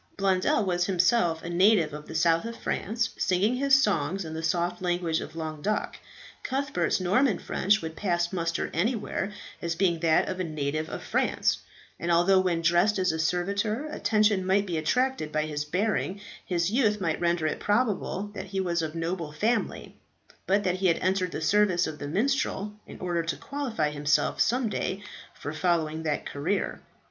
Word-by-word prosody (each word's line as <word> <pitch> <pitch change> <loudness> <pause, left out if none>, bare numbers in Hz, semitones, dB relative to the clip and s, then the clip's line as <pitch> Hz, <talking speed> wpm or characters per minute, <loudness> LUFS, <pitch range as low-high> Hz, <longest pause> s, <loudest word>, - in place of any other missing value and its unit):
Blondel 195 +1 +2
was 175 -1 +1
himself 180 -3 +2
a 170 - -5
native 175 -3 +4
of 150 0 -8
the - - -8
south 165 0 +3
of 230 0 -6
France, 225 +2 -2
singing 200 +6 +2
his 275 +1 +4
songs 165 - 0
in 160 - -6
the 160 - -4
soft 175 +2 -1
language 175 -2 0
of - - -8
Languedoc. 160 +5 -2 0.5
Cuthbert's 265 -12 0
Norman 205 +6 +2
French 205 0 +1
would 160 0 -5
pass 175 -2 0
muster 170 -2 -1
anywhere 210 +1 -1 0.3
as 170 -1 -2
being 170 -2 +1
that 160 -1 +3
of 185 0 -4
a - - 0
native 155 -1 -2
of - - -6
France; - - +1 0.4
and 170 - -1
although 175 +3 +5
when 175 -3 0
dressed 175 +5 +3
as 185 -2 +2
a 160 - -3
servitor 200 - 0
attention 210 -4 +2
might 195 +2 +2
be 175 -4 -3
attracted 250 +2 0
by 155 0 +1
his 150 -1 -3
bearing, 195 +3 -1 0.2
his 175 0 0
youth 215 -4 +2
might 165 -4 -1
render 170 -2 +1
it 155 - -1
probable 205 -2 0
that 190 -2 -6
he 195 -1 -4
was 170 -3 0
of 160 0 -4
noble 165 -1 -3
family, 220 +10 -1 0.5
but 200 +2 +3
that 185 -1 0
he 190 0 +1
had 170 - +3
entered 185 -1 0
the - - -4
service 200 -4 +3
of 155 -1 -6
the 145 - -5
minstrel 210 - 0
in - - -10
order 175 -2 -1
to 165 -3 -3
qualify 250 - -2
himself 145 0 +1
some 245 +1 +2
day 200 -1 -3 0.3
for 145 - -6
following 160 -2 0
that 150 -2 -2
career. 165 +8 -2
180 Hz, 180 wpm, -27 LUFS, 165-205 Hz, 0.5 s, although